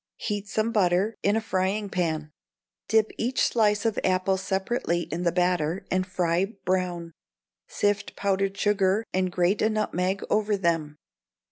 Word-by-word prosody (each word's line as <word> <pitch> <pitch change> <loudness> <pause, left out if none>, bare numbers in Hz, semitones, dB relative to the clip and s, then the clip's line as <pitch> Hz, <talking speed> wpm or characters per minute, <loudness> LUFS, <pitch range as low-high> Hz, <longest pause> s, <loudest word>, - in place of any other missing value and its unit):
Heat 205 -2 -3
some 215 +2 0
butter 195 0 +2
in 205 +1 +2
a 225 - +1
frying 195 0 -1
pan; 160 -5 -2 0.6
dip 220 -1 +3
each 245 +3 +1
slice 210 -2 +2
of 225 -2 +1
apple 185 +1 +2
separately 190 -1 -1
in 170 +1 -4
the 175 -1 +2
batter, 180 0 0
and 185 0 +1
fry 180 -1 +1 0.2
brown; 180 -2 -1 0.6
sift 205 0 -1
pounded 195 0 0
sugar, 205 +1 +2
and 185 -1 +1
grate 180 +3 +1
a 215 - +3
nutmeg 195 -3 -1
over 210 -1 +1
them. 165 -5 -1
190 Hz, 145 wpm, -26 LUFS, 180-210 Hz, 0.6 s, dip